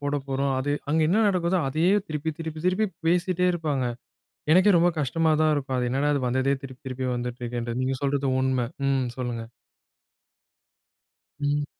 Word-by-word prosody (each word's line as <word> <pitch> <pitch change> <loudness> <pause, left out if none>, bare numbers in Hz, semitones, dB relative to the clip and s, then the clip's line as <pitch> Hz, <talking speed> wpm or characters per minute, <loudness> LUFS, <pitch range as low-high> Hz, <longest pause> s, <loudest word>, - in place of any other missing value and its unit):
போடப்போறோம். 140 -1 -1
அது 145 +2 -1 0.2
அங்க 160 +2 +2
என்ன 210 +6 +3
நடக்குதோ 180 -1 +1
அதயே 165 +7 +2 0.2
திருப்பி 155 +1 -2
திருப்பி 160 -1 -5
திருப்பி 185 +4 +2 0.2
பேசிட்டே 180 +1 +2
இருப்பாங்க. 150 -6 -1 0.7
எனக்கே 185 +2 +6
ரொம்ப 175 +1 +4
கஷ்டமா 160 +4 +1
தான் 155 - +4
இருக்கும். 135 -3 -2
அது 125 - 0
என்னடா 140 +3 +1
அது 140 - -1
வந்ததே 130 +2 +1
திருப்பி 130 -2 -10
திருப்பி 130 0 -3
வந்துட்டுருக்குன்றது. 120 0 -4
நீங்க 130 0 0
சொல்றது 140 0 0
உண்மை. 130 -2 +1 0.2
ம் 135 -2 +1
சொல்லுங்க. 120 -3 -3 2.0
ம். 145 0 0
140 Hz, 150 wpm, -25 LUFS, 130-165 Hz, 2.0 s, எனக்கே